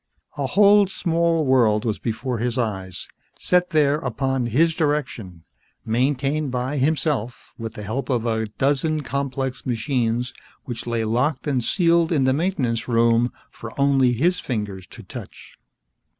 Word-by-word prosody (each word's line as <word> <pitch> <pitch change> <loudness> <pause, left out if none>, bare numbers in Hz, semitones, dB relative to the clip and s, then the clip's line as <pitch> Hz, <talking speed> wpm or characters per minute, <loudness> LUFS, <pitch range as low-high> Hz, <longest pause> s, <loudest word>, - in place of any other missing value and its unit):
A 140 -2 -2
whole 205 +4 +5
small 170 -3 0
world 115 -5 +3
was 110 -2 -1
before 115 +1 -3
his 120 +1 -1
eyes, 95 -6 -3 0.3
set 180 0 +2
there 150 -2 +3
upon 130 -2 -1
his 160 +8 +3
direction, 130 - -2 0.4
maintained 135 +5 0
by 130 +3 -2
himself 135 -4 -1
with 115 0 -6
the 105 - -7
help 120 +8 -3
of 120 -3 0
a 110 -1 0
dozen 145 +7 0
complex 135 -1 -3
machines 120 0 -1 0.3
which 120 -2 -6
lay 115 -1 -1
locked 125 +6 0
and 135 -5 0
sealed 170 - +2
in 145 -5 +2
the 130 0 +3
Maintenance 135 -8 -1
Room 115 0 +3 0.2
for 115 +3 -10
only 135 -3 +4
his 175 +9 +1
fingers 100 -6 -4
to - - -12
touch. - - -10
130 Hz, 145 wpm, -22 LUFS, 115-150 Hz, 0.4 s, whole